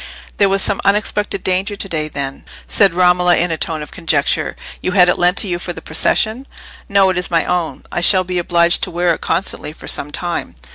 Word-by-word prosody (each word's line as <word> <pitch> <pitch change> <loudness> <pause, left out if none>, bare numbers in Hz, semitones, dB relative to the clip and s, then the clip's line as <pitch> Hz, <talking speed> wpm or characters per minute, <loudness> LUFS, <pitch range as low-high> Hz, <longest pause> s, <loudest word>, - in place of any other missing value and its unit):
"There 200 -1 +3
was 195 0 +3
some 200 - +1
unexpected 205 0 0
danger 190 +3 -1
to 200 - -5
day, 155 -4 -3
then?" 140 -2 -6 0.2
said 195 -5 +3
Romola, 180 -1 +3
in 175 0 0
a - - 0
tone 155 -1 -3
of 150 - -12
conjecture. 150 -4 -1 0.3
"You 185 - -2
had 180 -3 +5
it - - 0
lent 180 +2 +2
to - - +2
you 175 -2 -2
for 175 0 -6
the 160 - -9
procession?" 220 +10 0 0.4
"No; 195 -1 +3
it 180 - -1
is 180 - +1
my 165 -1 +1
own. 175 -2 -2
I - - -2
shall 185 +1 +5
be 180 0 -3
obliged 170 0 +2
to - - -1
wear 175 0 0
it - - -7
constantly, 165 -3 0
for - - -13
some 145 - 0
time." 175 +3 -4
180 Hz, 225 wpm, -16 LUFS, 165-195 Hz, 0.4 s, had